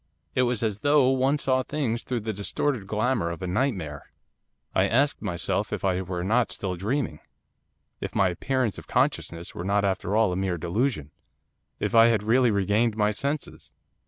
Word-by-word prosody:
It - - +2
was 120 -2 -1
as 105 -2 -1
though 145 0 +4
one 135 +2 +2
saw 130 -3 +1
things 130 -5 -2
through 125 -3 -3
the 110 +1 -3
distorted 105 +2 -2
glamour 110 -3 0
of 85 +2 -6
a - - -2
nightmare. 90 - -2 0.6
I - - +3
asked 140 +5 +2
myself 90 -5 -1
if - - -3
I 95 -1 +1
were 90 -1 -4
not 115 +5 +2
still 95 -2 -3
dreaming; 105 - -2 0.8
if - - -6
my 95 -2 +3
appearance 125 +5 -1
of - - -14
consciousness 85 0 -1
were 85 - -6
not 100 +1 +1
after 95 0 -1
all 110 -4 +3
a - - -2
mere 95 -1 -1
delusion; 85 - -1 0.7
if - - -2
I 115 0 +7
had 110 -3 +2
really 120 +3 +4
regained 105 +2 +1
my 105 -1 +2
senses. 140 +7 -3
105 Hz, 180 wpm, -26 LUFS, 95-130 Hz, 0.8 s, I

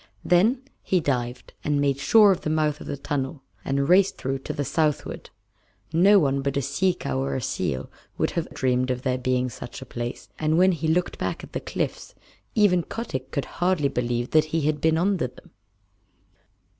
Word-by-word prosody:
Then 220 +9 +3 0.2
he 185 - +1
dived 125 -5 -2
and 145 -1 +1
made 140 -1 +1
sure 210 +7 +6
of 185 - 0
the - - -2
mouth 155 -1 0
of - - -8
the 140 - -3
tunnel, 135 0 -3 0.2
and 140 0 0
raced 190 +3 +4
through 135 +1 -2
to - - -5
the 145 - -3
southward. 150 +2 -1 0.6
No 195 +5 +6
one 140 -6 +2
but 140 0 -1
a - - +2
sea 175 +7 +1
cow 130 - -3
or 135 +1 -1
a - - 0
seal 65 -9 -2 0.3
would - - 0
have - - -3
dreamed 130 0 0
of 125 0 -2
there 130 -1 0
being 125 0 0
such 120 0 -8
a 130 - -9
place, 120 0 -5
and 155 +1 +1
when 185 +2 +5
he 165 -2 -2
looked 175 +3 0
back - - -3
at - - -11
the - - -1
cliffs - - -4 0.4
even 200 -5 +4
Kotick 160 - -5
could 140 - -2 0.2
hardly 175 -6 +2
believe 120 -1 -2
that 155 -1 +5
he 160 +1 -1
had 150 0 0
been 160 0 +3
under 180 -4 +1
them. 125 - -18
145 Hz, 195 wpm, -25 LUFS, 130-175 Hz, 0.6 s, sure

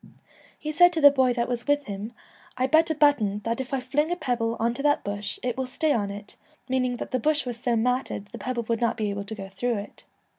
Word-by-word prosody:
He 305 - -4
said 350 +3 +6
to 330 - 0
the 285 -2 +9
boy 260 -2 +3
that 235 -1 -1
was 245 +1 -3
with 290 0 +2
him, 205 +1 -6 0.2
' - - -27
I 255 - +2
bet 315 +5 +4
a 315 - 0
button 235 -9 +3
that 230 +3 -1
if 260 - -8
I 270 - 0
fling 285 +5 0
a 350 - 0
pebble 240 -8 -1
on 230 +1 +1
to 245 - -5
that 290 0 +2
bush 205 0 -4
it 245 -2 -1
will 260 0 -3
stay 300 +4 +1
on 205 -3 0
it,' 205 +1 -8 0.3
meaning 255 -1 +1
i:hat - - -6
the 255 - +1
bush 300 +3 +1
was 240 -2 -5
so 240 -1 +1
matted 250 -2 0
the - - -8
pebble 250 -2 -2
would 230 0 -2
not 235 - +1
be 210 -2 -1
able 200 0 -4
to 220 - -6
go 195 -2 -7
through 230 +5 -2
it. 200 +1 -9
245 Hz, 265 wpm, -26 LUFS, 220-285 Hz, 0.3 s, the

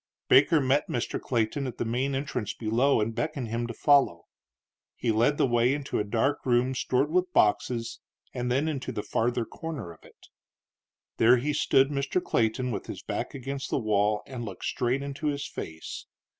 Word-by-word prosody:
Baker 150 +4 +6
met 140 +2 +2
Mr. 120 - -2
Clayton 125 +3 -1
at 125 - -6
the - - -2
main 130 +4 -1
entrance 135 -5 -3
below 120 +5 +2
and 110 +2 -1
beckoned 125 0 -3
him 120 +1 -2
to 115 - -5
follow. 140 -13 +3 0.7
He 120 - 0
led 120 +7 +2
the - - +3
way 120 +1 +2
into 145 -1 -3
a - - +1
dark 115 +7 0
room 125 +1 +2
stored 130 +3 0
with 180 +1 +1
boxes 115 +2 +1 0.3
and 125 0 -2
then 140 +5 +1
into 140 -4 -3
the 105 - -4
farther 120 0 0
corner 150 - -6
of 80 - -22
it. - - -19 0.9
There 120 +3 +6
he 145 +5 -1
stood 135 -1 +3
Mr. 140 +4 0
Clayton 125 -4 0
with 105 - -4
his - - -7
back - - -4
against 135 +1 -5
the - - 0
wall 105 -3 +1
and 125 -3 -6
looked 100 -5 -7
straight 125 +3 0
into 140 +2 -4
his 145 -1 -1
face. 80 0 -7
125 Hz, 185 wpm, -27 LUFS, 115-140 Hz, 0.9 s, Baker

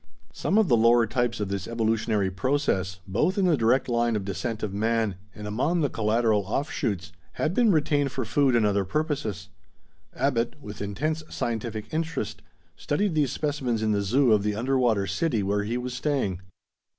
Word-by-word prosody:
Some 200 - 0
of 220 -3 +4
the 120 - +5
lower 115 +1 +5
types 120 +1 -1
of 105 -2 -2
this 100 -1 -3
evolutionary 110 -3 0
process, 95 - -1
both 120 - +1
in 195 - +3
the 175 -3 +4
direct 120 +1 +2
line 120 -1 +1
of 100 -2 -2
descent 110 +3 -3
of 105 -3 -2
man, 110 0 +1 0.2
and 105 - -8
among 140 +12 0
the 145 - 0
collateral 110 -1 +2
offshoots, 100 - -2 0.2
had 155 - -1
been 235 0 +4
retained 145 -4 +2
for 130 -2 -3
food 135 +1 +2
and 115 -2 +3
other 100 -1 +2
purposes. 135 - -2 0.7
Abbot, 125 0 0
with 105 -7 -9
intense 145 +11 -2
scientific 110 -2 -4
interest, 160 -8 -3 0.3
studied 195 +5 -1
these 145 -5 +1
specimens 135 -7 -1
in 110 - +2
the 100 -1 +1
zoo 120 +5 +3
of 105 - +3
the 105 0 -1
underwater 120 -3 +1
city 120 - 0
where 100 +1 0
he 115 +3 -1
was 125 0 -4
staying. 125 - -1
115 Hz, 175 wpm, -26 LUFS, 105-140 Hz, 0.7 s, the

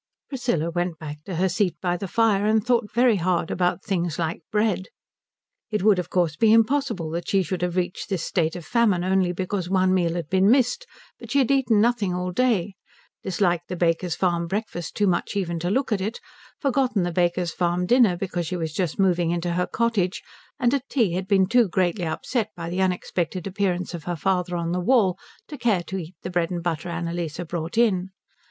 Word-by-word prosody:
Priscilla 240 - -1
went 175 -1 -2
back 150 -1 -8
to 185 - -5
her 185 +3 +2
seat 185 0 0
by 175 -1 0
the 195 +2 -5
fire, 210 0 +2
and 220 0 +2
thought 240 -4 +1
very 235 -1 +4
hard 175 -2 0
about 180 +1 0
things 175 -6 -1
like 165 0 -2
bread. 210 -3 +1 0.8
It 210 -4 -1
would 205 -3 +5
of 180 - -4
course 175 -4 +1
be 220 +6 +4
impossible 225 - +2
that 170 +1 -4
she 195 -1 +3
should 180 0 -4
have 180 -1 -1
reached 180 +2 -2
this 190 -5 -1
state 165 -3 0
of 175 -2 -7
famine 215 -7 +2
only 185 -1 +2
because 185 0 -3
one 185 -1 +3
meal 175 -2 +1
had 170 -4 -3
been 190 +3 +3
missed; 255 - +2 0.3
but - - -11
she 280 - +1
had 270 -2 +3
eaten 255 -6 +3
nothing 215 -5 +1
all 180 0 -2
day, 210 -3 +1 0.5
disliked 175 -2 0
the 180 - -3
Baker's 170 0 0
Farm 170 -2 0
breakfast 190 -4 -4
too 210 - +2
much 180 +1 0
even 170 -4 -1
to 175 +2 -2
look 260 +5 0
at 205 -3 +1
it, 215 +5 -3 0.4
forgotten 260 - +1
the 175 - -1
Baker's 175 0 +1
Farm 175 +1 0
dinner 225 -4 +4
because 175 -2 -3
she 185 - -3
was 160 -2 -3
just 175 -2 -2
moving 180 -3 +2
into 175 0 -1
her 180 +1 0
cottage, 220 -5 0 0.4
and 240 +1 +2
at 275 -1 -2
tea 230 -10 +2
had 185 +1 -3
been 195 -2 +4
too 230 +1 +3
greatly 180 0 0
upset 220 +7 -2
by 170 -1 -5
the 185 +2 -1
unexpected 180 -1 -1
appearance 185 -2 -1
of 170 -3 -7
her 175 - -2
father 180 +1 0
on 170 -1 -2
the 180 - 0
wall 190 -2 +3 0.3
to 295 - -9
care 210 -7 +1
to 190 +4 -5
eat 175 +1 -9
the - - -4
bread 175 -2 0
and 175 -2 -4
butter 170 0 -2
Annalise 170 -1 -3
brought 170 +4 -4
in. 190 -6 +2
185 Hz, 210 wpm, -24 LUFS, 175-210 Hz, 0.8 s, would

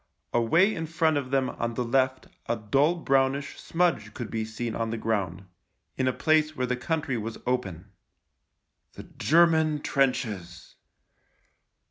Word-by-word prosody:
Away 165 - +3
in 160 -1 -4
front 160 -1 +1
of 135 -3 -3
them 135 -1 +1
on 115 0 -3
the 125 - -1
left 130 +1 +1 0.2
a 115 - +2
dull 135 +10 +2
brownish 135 -3 0
smudge 165 -12 0
could 120 -3 -6
be 110 -1 -1
seen 110 +1 -4
on 115 -1 -2
the 115 - -3
ground 100 -5 -2 0.3
— - - -50
in 130 - 0
a - - +3
place 155 +2 +2
where 125 - -1
the 125 0 -1
country 145 0 -2
was 110 +1 -5
open. 100 -7 -3 1.0
The - - -9
German 160 -2 +3
trenches 110 -11 -1
130 Hz, 150 wpm, -27 LUFS, 115-155 Hz, 1.0 s, Away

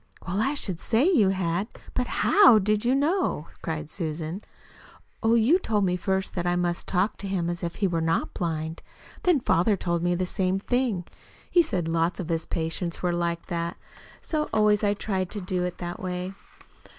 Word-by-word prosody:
"Well, 190 +3 0
I 275 +5 +1
should 185 - -2
say 235 - +2
you 220 - +4
had. 185 +1 -1 0.3
But 250 - 0
HOW 395 - +6
did 210 +1 +1
you 250 +2 +3
know 305 - +1
how?" - - -19
cried 160 -2 -4
Susan. 160 +2 -3 0.8
"Oh, 225 +1 +3
you 245 +11 +4
told 210 - +1
me 180 -1 +1
first 190 +1 -1
that 175 -1 -2
I 175 - +2
must 175 -1 -1
talk 195 +3 +1
to 200 - -5
him 175 -3 -1
as 175 - -5
if 170 -1 -3
he 200 - +1
were 170 -2 -1
not 165 0 0
blind. 160 -1 -3 0.4
Then 355 -5 +3
father 200 -2 +2
told 170 -1 -1
me 175 0 +1
the 185 +1 0
same 185 0 0
thing. 225 -4 0 0.5
He 350 - +6
said 185 - -1
lots 165 +1 0
of 180 -3 -4
his 165 -1 0
patients 165 +2 -3
were 175 -1 +1
like 170 -1 -1
that. 170 0 -3 0.4
So 305 -2 -1
I - - -14
always 210 0 +4
tried 190 -3 -2
to 210 - -4
do 180 -1 -2
it 180 - -4
that 175 +3 -5
way. 185 -1 -4
185 Hz, 200 wpm, -26 LUFS, 170-215 Hz, 0.8 s, HOW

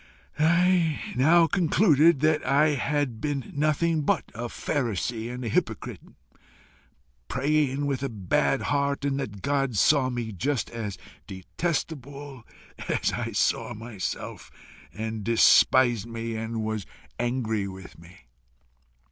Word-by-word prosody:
"I 170 0 +3 0.2
now 165 +7 +5
concluded 165 -4 +3
that 155 0 +2
I 150 +3 +3
had 140 -4 -1
been 145 +3 -3
nothing 155 +2 +1
but 145 - 0
a 120 +2 -5
pharisee 115 - -2
and 125 0 -6
a - - -2
hypocrite, 110 - -2 1.3
praying 145 0 0
with 135 -3 -1
a 140 - -2
bad 100 -5 0
heart, 140 0 0
and 140 -1 0
that 105 -8 -6
God 135 -5 0
saw 135 +4 +4
me 120 -3 -4
just 130 +7 -2
as 110 -4 -5 0.3
detestable 140 - -4 0.5
as - - 0
I - - -3
saw - - 0
myself, 110 -5 -6 0.4
and 110 -1 -5
despised 115 0 +4
me 115 0 -5
and 110 0 -3
was 110 -3 -3 0.3
angry 115 -4 -1
with 95 -3 -11
me. 85 +2 -16
130 Hz, 120 wpm, -26 LUFS, 110-145 Hz, 1.3 s, now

